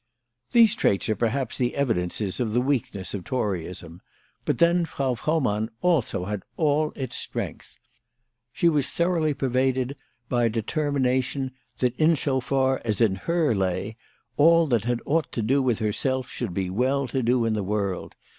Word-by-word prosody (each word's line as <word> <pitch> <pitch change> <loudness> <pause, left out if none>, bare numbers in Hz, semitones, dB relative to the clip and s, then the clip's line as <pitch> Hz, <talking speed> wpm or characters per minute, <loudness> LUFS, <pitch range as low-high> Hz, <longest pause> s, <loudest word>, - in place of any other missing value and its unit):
These 230 -3 +6
traits 100 - +1
are 110 - +2
perhaps 120 +4 -1
the 125 -1 0
evidences 105 -6 -1
of 115 -4 -1
the 120 - +3
weak 130 -1 0
ness 95 -2 -5
of 100 -3 -4
Toryism; 90 -7 -3 0.4
but - - 0
then 170 +1 +4
Frau 135 -5 -1
Frohmann 120 -6 0
also 155 - +1
had 105 0 -3 0.2
all 150 -1 +2
its 130 -3 -4
strength. - - -5 0.7
She 170 - +1
was 150 -5 +2
thoroughly 170 -4 +1
pervaded 130 0 0 0.3
by 120 -1 +1
a - - +3
determination 130 +2 0 0.3
that, 125 -1 0
in 160 +1 +4
as 155 - -3 0.2
far 130 0 +1
as 110 -4 -1
in 110 -4 +4
her 160 - +1
lay, 95 +2 -1 0.4
all 165 +2 +6
that 115 -4 +1
had 120 -1 0
aught 160 0 0
to 115 - -1
do 135 +6 +2
with 125 -4 +1
herself 125 +4 -1
should 120 -6 -4
be 95 -2 -1
"well 130 +6 +1
to 130 +1 -1
do" 120 0 +2
in 115 - +1
the 105 - -1
world. 100 -2 -2
125 Hz, 170 wpm, -25 LUFS, 110-145 Hz, 0.7 s, These